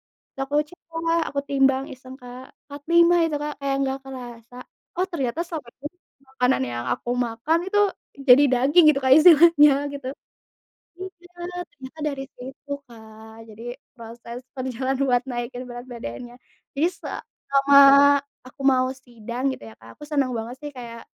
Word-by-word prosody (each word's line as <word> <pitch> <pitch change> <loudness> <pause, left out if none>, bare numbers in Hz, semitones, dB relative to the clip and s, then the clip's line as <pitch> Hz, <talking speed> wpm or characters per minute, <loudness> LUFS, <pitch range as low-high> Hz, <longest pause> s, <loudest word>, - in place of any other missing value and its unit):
terus - - -15
aku 275 +2 -7
cek 355 - -17
Kak, 330 0 0
aku 280 - -2
timbang 270 -1 +2
iseng 255 0 -12
Kak, 250 +1 -11 0.2
45 335 +4 +3
itu 310 -2 -2
Kak 295 0 -4
kayak 275 -1 -1
nggak 270 0 -2
kerasa. 245 -2 -10 0.4
Oh 370 - +1
ternyata 285 -5 -3
selama 310 -8 -7
ini 290 - -5 0.4
makanan 260 - 0
yang 120 0 -5
aku 240 - -4 0.2
makan 235 +9 -1
itu 410 +2 +1 0.5
jadi 255 +4 +8
daging 275 +7 +4
gitu 275 - -3
Kak 260 -1 +2
istilahnya 315 -2 +7 0.2
gitu. 275 -2 -6 0.9
Iya 355 -1 -11 0.4
ternyata 265 +1 -13
dari 275 -2 -3
situ 265 +3 -12 0.2
Kak, 220 -2 -14 0.2
jadi 215 +1 -12 0.4
proses 235 +1 -9 0.2
perjalanan 260 0 -3
buat 250 -3 +2
naikin 245 0 -5
berat 245 0 -9
badannya. 235 - -8 0.4
Jadi 290 +4 +1
selama 280 0 +1 0.7
aku 255 - -16
mau 255 -1 +4
sidang 245 0 -5
gitu - - -13
ya - - -15
Kak, 115 0 -16
aku - - -17
senang 280 -4 0
banget 230 +2 -5
sih 295 - -6
kayak, 235 -4 -10
265 Hz, 155 wpm, -23 LUFS, 240-290 Hz, 0.9 s, jadi